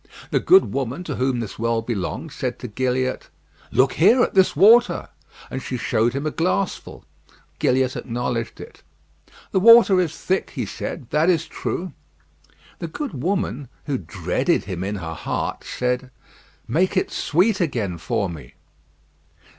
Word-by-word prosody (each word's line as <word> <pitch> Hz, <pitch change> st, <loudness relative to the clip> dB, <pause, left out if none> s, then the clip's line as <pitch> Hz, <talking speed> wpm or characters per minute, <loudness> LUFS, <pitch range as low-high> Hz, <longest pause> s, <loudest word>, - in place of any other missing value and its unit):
The -, -, +3 dB
good 380 Hz, +1 st, +5 dB
woman 135 Hz, +5 st, -3 dB
to 150 Hz, -6 st, -5 dB
whom 130 Hz, -1 st, 0 dB
this 110 Hz, -, -7 dB
well 115 Hz, 0 st, 0 dB
belonged 120 Hz, -, -4 dB
said 130 Hz, -3 st, -3 dB
to 125 Hz, -, -7 dB
Gilliatt: 130 Hz, +3 st, -2 dB, 0.4 s
"Look 130 Hz, +3 st, +3 dB
here, 225 Hz, +9 st, +5 dB
at -, -, -1 dB
this 190 Hz, -1 st, +4 dB
water;" 225 Hz, +9 st, +5 dB, 0.4 s
and 130 Hz, -, -4 dB
she 125 Hz, -, -4 dB
showed 115 Hz, +1 st, +1 dB
him 140 Hz, +2 st, -3 dB
a 155 Hz, -, 0 dB
glassful. 185 Hz, +4 st, -2 dB, 0.5 s
Gilliatt 130 Hz, 0 st, +2 dB
acknowledged 120 Hz, -1 st, -3 dB
it. -, -, -11 dB, 0.7 s
"The 190 Hz, -, +2 dB
water 225 Hz, -3 st, +7 dB
is 160 Hz, -3 st, -3 dB
thick," 190 Hz, +1 st, -2 dB
he -, -, -2 dB
said; 130 Hz, -8 st, -6 dB
"that 155 Hz, +4 st, +3 dB
is 165 Hz, -3 st, +2 dB
true." 180 Hz, -3 st, -4 dB, 0.9 s
The 170 Hz, -, -4 dB
good 275 Hz, -, -5 dB
woman, 145 Hz, -, -1 dB, 0.2 s
who 140 Hz, -4 st, -1 dB
dreaded 85 Hz, -2 st, -1 dB
him 95 Hz, -2 st, -5 dB
in 100 Hz, +2 st, -3 dB
her 80 Hz, -4 st, -5 dB
heart, -, -, -3 dB
said, 125 Hz, +1 st, -2 dB, 0.6 s
"Make 185 Hz, +5 st, +1 dB
it -, -, 0 dB
sweet 190 Hz, +6 st, +1 dB
again 110 Hz, -, -2 dB
for 100 Hz, +4 st, -1 dB
me." 75 Hz, -8 st, -10 dB
130 Hz, 155 wpm, -22 LUFS, 115-180 Hz, 0.9 s, water